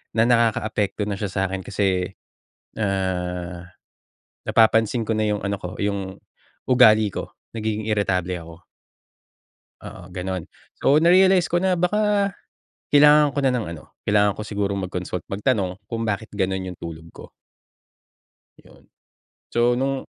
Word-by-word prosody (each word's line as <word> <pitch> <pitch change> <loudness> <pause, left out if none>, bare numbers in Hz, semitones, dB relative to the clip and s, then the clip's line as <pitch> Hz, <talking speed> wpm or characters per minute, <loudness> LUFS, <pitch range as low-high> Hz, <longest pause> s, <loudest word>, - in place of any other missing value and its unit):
na 110 - +4
nakakaapekto 110 -3 +1
na 105 - -2
siya 100 -3 -2
sa'kin 95 -1 -2
kasi, 95 -3 0 0.7
ah, 90 -3 -2 0.8
napapansin 115 0 +3
ko 110 - +1
na 110 - +1
yung 105 -1 -1
ano 100 0 -2
ko, 90 0 -8
yung 100 -2 -3 0.5
ugali 110 -4 +6
ko, - - -7 0.2
nagiging 110 0 -3
iritable 95 -4 0
ako. 85 -1 -11 1.3
Oo, 90 - -10
ganun. 95 -2 -4 0.3
So, 150 +3 +3
na-realize 185 +1 +5
ko 175 - +1
na 185 +1 +2
baka 200 +2 +1 0.6
kailangan 150 0 +6
ko - - -2
na 130 - +3
ng 115 - -2
ano, 75 - -13 0.2
kailangan 105 -1 +2
ko - - -5
siguro 100 -2 -2
mag-consult 90 -2 -4
magtanong 100 -3 -1
kung 115 0 -3
bakit 110 0 -2
ganun 95 -1 -1
yung 90 -1 -7
tulog 80 -1 -8
ko. - - -10 1.4
Yun, - - -20 0.6
so 120 +1 +2
nung 135 +2 -1
105 Hz, 135 wpm, -23 LUFS, 95-120 Hz, 1.4 s, ugali